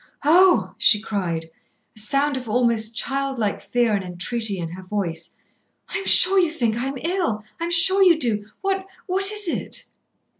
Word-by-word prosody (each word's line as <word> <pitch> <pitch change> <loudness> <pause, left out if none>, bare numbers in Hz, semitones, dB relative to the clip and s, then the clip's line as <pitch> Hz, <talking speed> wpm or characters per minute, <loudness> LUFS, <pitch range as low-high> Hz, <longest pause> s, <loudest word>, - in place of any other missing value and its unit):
"Oh!" 315 - +4
she 215 -3 +5
cried, 175 -7 -4 0.4
a - - -5
sound 275 +6 0
of 250 -3 -7
almost 230 -1 0
child 275 +2 -1
like 210 -3 -2
fear 240 -2 0
and 200 -2 -1
entreaty 195 +4 -4
in 170 -2 -5
her 180 +3 -10
voice. 180 -4 -5 0.5
"I - - -3
am 390 - -7
sure 385 +1 +7
you 350 -3 +2
think 235 -9 -2
I 245 +3 -3
am 270 0 -5
ill, 330 - -2 0.2
I 335 - -3
am - - -4
sure 375 +3 +6
you 355 -4 +5
do. 220 -8 -2
What 390 -1 -2 0.2
what 390 +2 +1
is 420 -2 +1
it?" - - -3
240 Hz, 185 wpm, -21 LUFS, 210-340 Hz, 0.5 s, sure